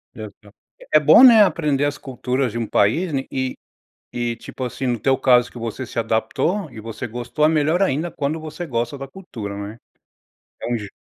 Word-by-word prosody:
Exa - - -11 0.4
É - - +8
bom, - - +7
né, 230 -4 +9
aprender 150 -6 +1
as 145 -1 -2
culturas 130 -1 -2
de 115 - -5
um 115 -1 -2
país, 160 - +1
né? 135 -1 0
E 130 -1 -2 0.6
e 120 -1 -1
tipo 130 - -8
assim, 125 +1 -4
no 120 -3 0
teu 135 +4 +2
caso, 125 -2 +3
que - - -12
você 115 +2 -5
se - - -10
adaptou 115 - -1
e 115 - -10
você 115 +3 -6
gostou. 120 +6 -3
É - - +6
melhor 160 +3 +2
ainda 165 -2 0
quando 150 +2 -2
você 155 +2 -7
gosta 120 -1 -2
da 135 0 -7
cultura, 120 - -8
não 100 - -5
é? 110 +2 -10 0.9
Entendi 115 -4 -3
130 Hz, 195 wpm, -21 LUFS, 115-155 Hz, 0.9 s, né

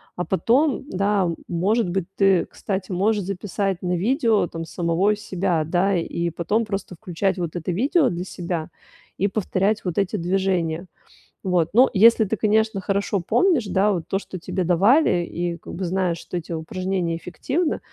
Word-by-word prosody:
А 180 - -3
потом, 265 +8 +1
да, 200 0 +1 0.2
может 195 +5 +1
быть, 180 0 -1
ты, 195 -3 +3
кстати, 190 -1 -5
можешь 205 +3 +1
записать 195 0 -2
на 180 -1 -1
видео 225 - +2
там 165 -1 -6
самого 175 +5 +1
себя, 185 -5 -1
да, 180 +4 +1
и 170 0 -2
потом 205 +8 -1
просто 195 -3 -4
включать 190 +1 -2
вот 170 -1 -3
это 175 +2 -3
видео 270 - +2
для 175 +1 -4
себя 170 -3 -4 0.5
и 200 - +2
повторять 205 +1 0
вот 175 - -3
эти 200 +1 0
движения. 175 -2 0 0.6
Вот, 180 -4 +1
ну, 255 +4 +7
если 220 +2 +6
ты, 215 +3 -1
конечно, 220 -1 +1
хорошо 200 0 -1
помнишь, 295 - +2
да, 200 +2 +2
вот 165 -3 -4
то, 195 - 0
что 185 -2 -8
тебе 185 +2 -2
давали 185 - +4
и 170 0 -3
как - - -10
бы 185 +1 -3
знаешь, 180 -1 0
что 180 - -8
эти 170 - -7
упражнения 175 +1 -2
эффективны, 280 - -2
190 Hz, 165 wpm, -23 LUFS, 175-210 Hz, 0.6 s, ну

